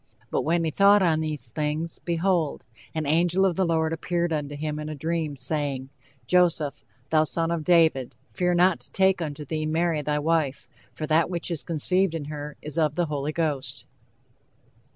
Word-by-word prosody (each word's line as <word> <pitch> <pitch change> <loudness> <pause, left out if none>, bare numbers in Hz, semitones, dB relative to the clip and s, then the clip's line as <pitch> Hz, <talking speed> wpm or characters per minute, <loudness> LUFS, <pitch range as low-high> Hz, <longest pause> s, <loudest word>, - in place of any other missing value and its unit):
But - - +1
when 165 +2 +1
he 160 - 0
thought 200 +3 +5
on 160 -3 +3
these 150 -7 -2
things, 155 +4 -2
behold, 170 -2 0 0.3
an 155 -1 -1
angel 175 +5 +3
of 185 -3 +1
the 190 0 +1
Lord 160 -1 +1
appeared 170 0 -1
unto 145 -1 -3
him 150 +1 -3
in 150 0 -5
a 155 - -5
dream, 160 -1 -2
saying, 135 0 -3 0.4
Joseph, 165 -2 +2 0.3
thou 155 -1 +5
son 165 +1 -1
of 170 -2 -1
David, 160 -7 +3 0.2
fear 180 -1 +1
not 180 0 +4
to - - -14
take 190 -1 +3
unto 150 -2 -4
thee 155 +1 -2
Mary 160 0 +1
thy 150 0 -1
wife; 150 -2 0 0.2
for 155 - -5
that 160 +2 +2
which 175 0 -3
is 165 - -3
conceived 180 +2 0
in 155 -3 -4
her 150 0 -7
is 150 +2 -3
of 150 -2 +1
the 175 0 +1
Holy 150 -1 -2
Ghost." 155 -5 -2
160 Hz, 185 wpm, -25 LUFS, 150-170 Hz, 0.4 s, thought